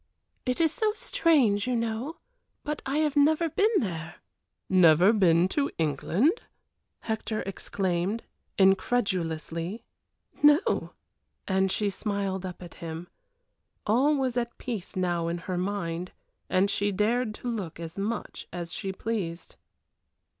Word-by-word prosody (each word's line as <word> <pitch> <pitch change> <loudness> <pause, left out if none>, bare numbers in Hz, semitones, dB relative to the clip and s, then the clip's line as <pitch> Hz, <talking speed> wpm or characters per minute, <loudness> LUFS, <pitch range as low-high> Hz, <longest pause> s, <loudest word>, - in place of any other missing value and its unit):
"It 250 - 0
is 325 -2 +4
so 430 +2 0
strange, 285 - +2
you 250 - +1
know, 230 +6 -2 0.5
but 300 0 -3
I 275 +2 0
have 305 -2 +1
never 315 +3 +4
been 415 +7 +3
there." 170 - -3 0.5
"Never 180 +2 +6
been 175 -4 +4
to 280 +6 0
England!" 170 - +1 0.6
Hector 220 -1 -2
exclaimed, 190 +1 -2 0.3
incredulously. 190 -2 +1 0.6
"No!" 295 +5 +4 0.5
and 190 0 +2
she 205 0 0
smiled 195 -2 -2
up 180 0 -8
at 175 - -10
him. 165 +1 -6 0.8
All 260 +8 +3
was 260 -3 0
at 240 -1 -2
peace 225 -8 -5
now 175 -2 0
in 170 +1 -1
her 180 +1 -4
mind, 180 -2 -3 0.4
and 195 +2 +3
she 205 +1 +1
dared 215 +3 +1
to 245 - -7
look 195 -9 -4
as 165 +3 -6
much 215 +3 -4
as 175 -1 -5
she 195 -2 -3
pleased. 190 -5 -4
200 Hz, 130 wpm, -28 LUFS, 175-245 Hz, 0.8 s, Never